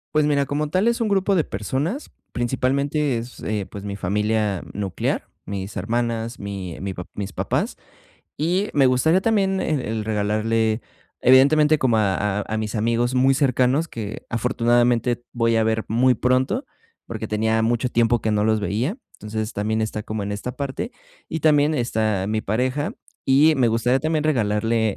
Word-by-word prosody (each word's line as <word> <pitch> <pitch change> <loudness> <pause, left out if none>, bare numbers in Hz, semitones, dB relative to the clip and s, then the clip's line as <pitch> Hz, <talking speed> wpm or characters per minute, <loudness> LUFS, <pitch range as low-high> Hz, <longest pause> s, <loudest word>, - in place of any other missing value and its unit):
Pues, 155 -1 +4
mira, 140 -2 +2
como 145 +2 -2
tal 190 +8 +2
es 235 - -1
un 230 - +1
grupo 200 -1 +2
de 165 -5 +2
personas, 140 - -3 0.2
principalmente 135 +3 0
es, 120 +2 -7
eh, 105 -2 -2
pues, 100 +1 -9
mi 100 -1 -4
familia 105 0 0
nuclear, 100 -3 -2 0.2
mis 100 0 -5
hermanas, 115 0 -2
mi 95 -4 -6
mi 95 0 -3
pa 90 -1 -7
mis 100 -1 -5
papás, - - -2 0.6
y 180 +7 0
me 140 -2 +4
gustaría 145 +8 +3
también 195 -3 +2
el 150 -3 0
el 110 -2 -3
regalarle 110 +1 0 0.4
evidentemente 150 +4 +5
como 120 -4 +2
a 105 -1 +1
a - - -4
a 110 - -2
mis 110 -1 -3
amigos 115 +3 +1
muy 130 +1 +4
cercanos, 135 +3 +2
que 110 -5 -7
afortunadamente 120 0 +1
voy 115 -1 +1
a 110 - +3
ver 110 0 0
muy 125 +3 +3
pronto, 130 - +1 0.4
porque 110 -1 -5
tenía 110 +1 +1
mucho 120 +2 +1
tiempo 120 -1 +2
que 110 - -1
no 105 0 +1
los 110 0 +2
veía. 115 - -1 0.2
Entonces, 110 +1 -5
también 110 +2 -1
está 110 -1 -2
como 105 0 -4
en 100 - -4
esta 105 +5 -4
parte 140 - -4 0.4
y 160 - -2
también 150 0 +4
está 110 -6 0
mi 110 0 -1
pareja. 130 +7 -1 0.3
Y 145 +4 +5
me 125 -3 +3
gustaría 115 +3 +2
también 155 +1 -1
regalarle 110 -5 +1
115 Hz, 170 wpm, -22 LUFS, 110-140 Hz, 0.6 s, evidentemente